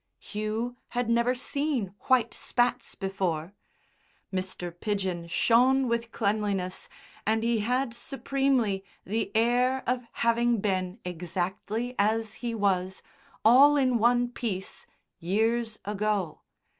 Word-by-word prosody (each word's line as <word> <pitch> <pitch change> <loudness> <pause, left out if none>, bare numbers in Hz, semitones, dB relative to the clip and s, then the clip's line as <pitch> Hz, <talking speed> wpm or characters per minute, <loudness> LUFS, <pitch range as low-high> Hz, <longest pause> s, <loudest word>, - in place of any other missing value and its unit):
Hugh 220 +3 -4 0.2
had 245 -1 +1
never 235 +2 +3
seen 270 -6 -1
white 250 -3 +3
spats 245 +1 -1
before. 190 -3 -2 0.8
Mr. 185 -1 -3
Pidgen 185 -3 -2
shone 255 +8 +4
with 235 0 -1
cleanliness, 200 -4 -1 0.3
and 220 +1 +1
he 230 -1 +2
had 250 +3 0
supremely 260 -5 0 0.2
the 210 0 -2
air 245 +3 +2
of 250 0 0
having 235 0 +2
been 185 -1 -1
exactly 185 +7 -3
as 220 +1 +1
he 235 -2 -2
was, 190 -3 0 0.4
all 275 +6 +7
in 255 -4 +2
one 240 +2 +3
piece, 210 -6 -5 0.3
years 220 +5 0
ago. 205 -4 -1
225 Hz, 110 wpm, -28 LUFS, 195-245 Hz, 0.8 s, all